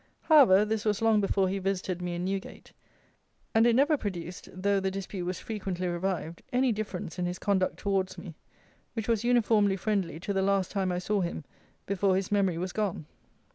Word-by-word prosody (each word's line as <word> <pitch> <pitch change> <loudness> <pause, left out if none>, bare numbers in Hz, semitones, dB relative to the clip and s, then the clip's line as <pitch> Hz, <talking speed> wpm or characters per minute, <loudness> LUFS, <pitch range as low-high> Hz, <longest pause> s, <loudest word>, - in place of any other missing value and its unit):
However, 240 - +6
this 215 0 -1
was 210 -2 +1
long 220 -2 +4
before 195 -1 +1
he 195 +1 -2
visited 185 -2 -2
me 175 -1 -3
in 175 +1 -3
Newgate: 195 +1 -5 0.8
and 225 +1 +5
it 235 - +4
never 290 +4 +4
produced 180 -6 -6
(though 200 +2 +1
the 190 0 -1
dispute 190 -1 -5
was 180 -1 -2
frequently 190 -4 -4
revived) 175 -1 -3
any 255 0 +2
difference 200 -5 -4
in 175 - 0
his 180 +1 -4
conduct 190 -2 0
towards 195 -2 -1
me, 175 -5 -8 0.6
which 225 -3 -4
was 230 -2 +1
uniformly 220 -5 +3
friendly 195 -4 -1
to 200 - -2
the 195 - +1
last 195 -1 +1
time 190 -3 0
I 180 - -1
saw 200 +3 0
him 170 -3 -3 0.4
before 195 -1 +1
his 190 +1 -2
memory 195 -4 +2
was 180 +1 -3
gone. 200 -7 -2
195 Hz, 190 wpm, -29 LUFS, 180-210 Hz, 0.8 s, However